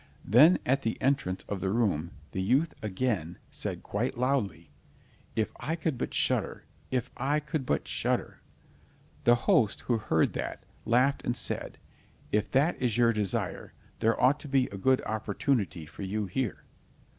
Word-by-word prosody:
Then 145 - +7
at 135 +2 +2
the 115 - -2
entrance 130 -9 0
of 100 -2 -3
the 95 - 0
room 95 -7 +1 0.2
the 95 - -2
youth 135 - +2
again 95 -5 -1
said - - -4
quite - - -2
loudly, 105 - -1 0.6
"If 110 -1 0
I 160 - -1
could 160 -3 -1
but - - -3
shudder! - - 0 0.2
If 125 -1 -1
I 140 +4 +1
could 150 -2 -4
but 70 - 0
shudder!" - - -1 0.8
The 120 - +7
host 145 - +3
who 120 -2 0
heard 95 -8 +1
that, - - -4 0.2
laughed 130 +5 +3
and 120 - -1
said: - - -4 0.5
"If 105 0 +1
that 145 +5 +2
is 120 -4 +1
your 120 -1 +4
desire, 105 -3 -2 0.3
there 115 +1 +2
ought 135 +4 +4
to 150 - -9
be 135 -2 +3
a - - -6
good 130 +5 +3
opportunity 105 - -1
for 75 - -11
you 100 +2 -2
here." 110 +4 -3
120 Hz, 160 wpm, -29 LUFS, 100-135 Hz, 0.8 s, Then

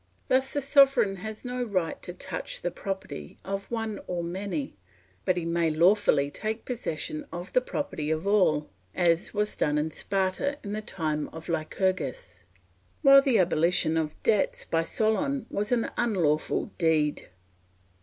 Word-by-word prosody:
Thus 265 +1 +3
the 285 - 0
sovereign 275 -8 +4
has 220 +5 -7
no 250 0 -3
right 185 -8 -1
to - - -6
touch 180 -1 -6
the 175 - -1
property 190 - -6
of 195 +1 -4
one 225 -3 -3
or 175 -1 -2
many; 200 - -3 0.5
but 185 -2 +2
he 170 - -2
may 170 -1 +1
lawfully 160 -3 +3
take 220 +5 -4
possession 250 - -3
of 175 +2 -7
the 255 - +4
property 160 - -3
of 160 +3 -1
all, 180 -8 +3 0.3
as 170 0 +2
was 210 0 0
done 150 0 +1
in 155 +1 0
Sparta 195 - -1
in 205 -1 -4
the 215 - -2
time 155 -8 -2
of 160 +2 -10
Lycurgus; 165 - -2 0.6
while 275 0 +9
the 270 -5 +3
abolition 170 -2 +2
of 155 -2 -1
debts 215 -3 +1
by 165 - +1
Solon 225 - 0
was 210 +2 -2
an 240 -2 +1
unlawful 175 -10 +1
deed. 155 -3 +1
190 Hz, 155 wpm, -27 LUFS, 165-225 Hz, 0.6 s, while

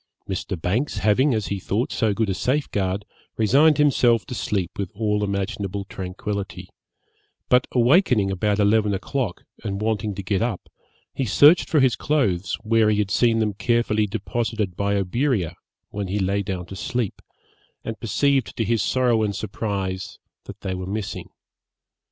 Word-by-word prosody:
Mr. 95 -2 -3
Banks 110 - -1
having, 105 +8 +3
as 105 -6 -2
he 100 - -2
thought, 105 +6 -1
so 110 -3 +1
good 110 +2 0
a - - 0
safeguard, 100 -6 -1 0.3
resigned 140 +7 +4
himself 120 -7 +3
to - - -7
sleep 95 -4 -2
with 100 -3 -2
all 105 -1 0
imaginable 100 0 -3
tranquillity; 95 +1 -5 0.8
but 125 0 +4
awakening 125 - +3
about 100 +2 0
eleven 105 0 +3
o'clock, 120 -1 -3 0.2
and 100 -3 -3
wanting 105 -1 -1
to 100 - -5
get 100 +1 0
up, 115 -5 -3 0.4
he 135 - -2
searched 145 - +5
for 155 - +3
his 130 -3 +4
clothes 100 - 0
where 110 -1 +3
he 105 - +2
had 105 -2 0
seen 115 -2 +3
them 110 -2 +1
carefully 110 -1 +1
deposited 105 -1 -2
by 100 +2 0
Oberea, 100 - 0 0.4
when 100 -1 -3
he 95 +3 -2
lay 100 +1 0
down 95 -3 -4
to 95 - -9
sleep, 120 +1 -3 0.6
and 115 -1 -5
perceived 135 +2 +1
to 115 - +1
his 115 0 +1
sorrow 125 -3 +2
and 105 -2 -1
surprise, 95 -3 -4 0.3
that - - -10
they 95 -2 -3
were 95 0 -5
missing. 100 0 -4
105 Hz, 160 wpm, -23 LUFS, 95-120 Hz, 0.8 s, searched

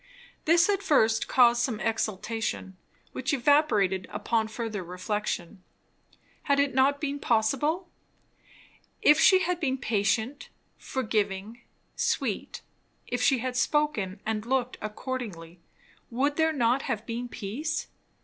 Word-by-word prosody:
This 335 +2 +5
at 400 -1 +1
first 225 - +3
caused 240 -1 +5
some 235 -3 -1
exultation, 220 -3 -2 0.4
which 280 +3 -1
evaporated 235 - +2
upon 220 +2 -1
further 220 -3 -4
reflection. 185 0 -4 0.9
Had 280 0 +4
it 280 -2 +2
not 270 +2 +3
been 285 -1 -3
possible? 275 +10 +1 1.2
If 300 +1 +6
she 375 +2 +6
had 360 0 -1
been 270 -5 0
patient, 220 +2 -1 0.3
forgiving, 215 -2 -2 0.3
sweet; - - -2 0.4
if 245 0 -3
she 260 +3 +4
had 255 -1 -2
spoken 255 -9 0
and 215 -1 -2
looked 255 +1 -1
accordingly; 210 -7 -6 0.5
would 280 +5 0
there 320 0 +2
not 250 -2 +2
have 220 0 -2
been 240 +1 -4
peace? 290 +11 -3
240 Hz, 120 wpm, -27 LUFS, 215-280 Hz, 1.2 s, If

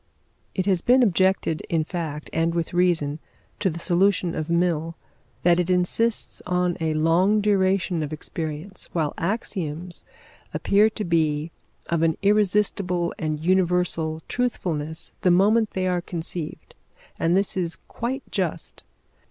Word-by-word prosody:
It 185 - 0
has 190 -4 +2
been 250 +4 +5
objected, 190 -5 +2
in 165 -2 +1
fact, 155 -3 -5
and 165 +1 +1
with 170 0 -2
reason, 165 -4 +1 0.4
to 190 - +2
the 165 - -5
solution 180 0 +2
of 155 0 -3
Mill, 170 -1 +1 0.5
that 175 0 +4
it 180 0 0
insists 185 +6 +1
on 180 -1 +1
a 160 -1 0
long 175 +7 +3
duration 190 -4 +2
of 150 -1 -3
experience, 160 +4 -6
while 155 -4 0
axioms 175 -3 -3 0.5
appear 210 +2 +4
to 215 0 -5
be 160 -2 +1 0.3
of 170 -1 0
an 165 -1 +2
irresistible 200 -3 +2
and 155 -1 -2
universal 175 -3 +1
truthfulness 160 -11 -2
the 185 - +3
moment 210 +5 +4
they 185 -1 -1
are 180 -1 +1
conceived. 170 -2 -6 0.5
And 170 +3 +3
this 195 0 +1
is 175 -3 -1
quite 260 +4 -3
just. - - -2
175 Hz, 135 wpm, -24 LUFS, 160-190 Hz, 0.5 s, been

